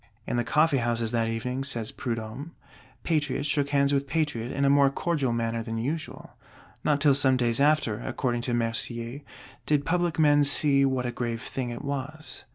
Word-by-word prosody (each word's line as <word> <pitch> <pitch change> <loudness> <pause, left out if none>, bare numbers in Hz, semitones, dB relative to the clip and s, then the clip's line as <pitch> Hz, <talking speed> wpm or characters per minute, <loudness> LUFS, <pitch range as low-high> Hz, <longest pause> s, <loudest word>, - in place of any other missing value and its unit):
In - - -2
the 120 - +1
coffee 150 +2 +2
houses 115 -1 -1
that 115 -1 +1
evening, 125 +4 -3
says 120 -5 0
Prudhomme, 120 +7 -5 0.5
Patriot 150 -4 0
shook 145 -1 +1
hands 140 0 +2
with 140 0 0
Patriot 140 -6 -1
in 140 - 0
a - - +4
more 140 0 +5
cordial 140 -3 -1
manner 115 0 -1
than 115 0 -4
usual. 145 +7 -4 0.5
Not 150 -1 +2
till 145 -1 +5
some 135 -1 +3
days 120 +1 +1
after, 145 -8 +2
according 120 -3 -2
to - - 0
Mercier, 115 +2 -2 0.5
did 145 -1 +2
public 175 -2 0
men 145 -2 +5
see 140 -1 +3
what 130 -2 0
a 120 - -1
grave 120 -1 -4
thing 130 -2 -4
it 120 - -6
was. 140 0 -6
135 Hz, 180 wpm, -27 LUFS, 120-145 Hz, 0.5 s, more